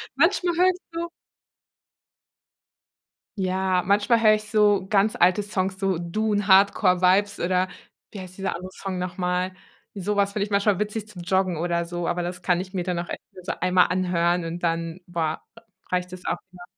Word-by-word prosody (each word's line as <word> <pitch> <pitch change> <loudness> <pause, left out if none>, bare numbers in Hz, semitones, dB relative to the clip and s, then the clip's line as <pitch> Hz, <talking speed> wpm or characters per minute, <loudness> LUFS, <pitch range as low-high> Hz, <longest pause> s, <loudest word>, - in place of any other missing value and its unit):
Manchmal 350 -1 +2
höre 365 +1 +5
ich 365 -1 -2
so 340 +1 -3 2.3
Ja, 185 -1 0
manchmal 210 +4 +3
höre 215 -1 +6
ich 215 0 -5
so 205 -3 +3
ganz 210 +2 +3
alte 185 0 +3
Songs, 190 -2 -2
so 195 -2 0
“Dune 205 +4 -1
Hardcore 190 -1 +5
Vibes“ 200 +3 +3
oder 185 +1 +1 0.4
wie 205 - -9
heißt 185 -1 -9
dieser 195 -3 -2
andere 185 +2 -9
Song 190 -2 -5
noch 180 0 -4
mal? 180 0 -1 0.4
Sowas 200 +1 0
finde 205 - -2
ich - - -14
manchmal 200 -1 +2
witzig 210 0 -3
zum 180 -5 -10
Joggen 185 -1 +1
oder 170 +1 -1
so, 175 0 -4
aber 175 0 -1
das 180 0 -5
kann 180 -1 +2
ich 185 +1 -8
mir 180 - -1
dann 180 -1 -2
auch 175 - -4
echt - - -6
nur 185 - -13
so - - -2
einmal 180 0 +4
anhören 175 -1 +1
und 170 +1 -5
dann, 165 +1 -1
boah, 165 -3 -2 0.2
r 230 - -15 0.3
reicht 180 0 -1
es 180 -1 -9
auch - - -1
wieder. 180 -1 -13
185 Hz, 190 wpm, -24 LUFS, 180-205 Hz, 2.3 s, höre